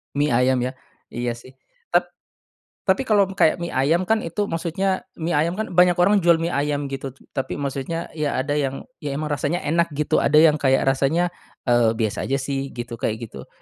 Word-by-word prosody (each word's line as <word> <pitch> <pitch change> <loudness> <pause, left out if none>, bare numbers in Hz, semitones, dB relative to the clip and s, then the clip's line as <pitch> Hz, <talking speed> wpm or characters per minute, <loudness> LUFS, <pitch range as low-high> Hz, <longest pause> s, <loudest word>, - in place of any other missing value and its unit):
Mie 145 +1 +1
ayam 125 +2 +3
ya? 125 +2 -2 0.4
Iya 120 0 -2
sih. 130 +2 -15 0.4
Tap - - +2 0.7
tapi 195 +7 +1
kalau 205 -2 +5
kayak 160 -4 +3
mie 170 - -3
ayam 150 +7 +2
kan, 220 0 +4
itu 205 +3 -3
maksudnya 185 +3 -1
mie 170 +1 -3
ayam 170 +4 +1
kan 220 +1 -4
banyak 180 0 +5
orang 200 +4 +4
jual 170 -2 +5
mie 170 - -1
ayam 145 -1 -1
gitu 135 -1 -5 0.2
tapi 135 - -3
maksudnya 140 +3 -4
ya 150 -2 -2
ada 145 +2 -1
yang 135 -2 -2 0.2
ya 145 -4 -4
emang 150 +1 -3
rasanya 145 +6 -1
enak 170 +3 +2
gitu, 150 +1 +1
ada 145 - +2
yang 155 -2 +5
kayak 135 -1 +3
rasanya, 140 +6 +1 0.4
eee, 120 -2 +4
biasa 110 -2 -2
aja 135 - +1
sih 135 0 -3
gitu 120 -1 -6
kayak 110 -5 -1
gitu. - - -10
145 Hz, 195 wpm, -22 LUFS, 135-170 Hz, 0.7 s, kalau